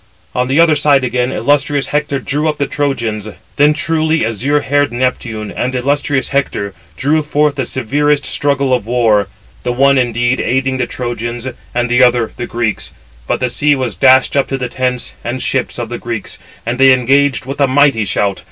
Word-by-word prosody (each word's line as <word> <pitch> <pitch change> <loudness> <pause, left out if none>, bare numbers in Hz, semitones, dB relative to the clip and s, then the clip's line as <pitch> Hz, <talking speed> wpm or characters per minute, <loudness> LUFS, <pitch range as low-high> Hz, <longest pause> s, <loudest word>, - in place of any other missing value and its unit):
On 125 0 0
the 135 +4 +1
other 165 -2 +5
side 145 -2 +3
again 125 0 0
illustrious 145 0 +1
Hector 145 -1 -1
drew 145 +4 -1
up 150 - -3
the 140 - 0
Trojans. 115 -8 -2 0.3
Then 145 +1 +5
truly 160 -2 +1
azure 130 +7 0
haired 145 0 +1
Neptune 120 -4 -2
and 130 +1 -3
illustrious 140 +1 0
Hector 130 -8 -1 0.2
drew 150 +4 +1
forth 150 0 +1
the 135 -3 -3
severest 145 +4 0
struggle 140 -2 0
of 120 -4 -1
war, 115 -4 +2 0.3
the 125 - -2
one 135 +2 +3
indeed 120 +1 0
aiding 130 +1 0
the - - -1
Trojans, 120 0 -4 0.3
and 120 0 +1
the 120 +1 +2
other 120 -2 +2
the 120 - -5
Greeks. 115 -3 -2 0.3
But - - -1
the 125 - 0
sea 145 +3 +2
was 125 -6 -2
dashed 130 0 +4
up 140 - +2
to 135 - -2
the 125 -2 -4
tents 125 -1 -2
and 120 +2 -3
ships 130 0 -1
of 120 -2 -4
the 120 - -5
Greeks 115 -3 -5 0.3
and 120 +2 -3
they 135 0 +7
engaged 135 0 +2
with 135 +2 -5
a 140 - +4
mighty 135 -4 +3
shout. 100 +1 -1
130 Hz, 190 wpm, -15 LUFS, 120-145 Hz, 0.3 s, they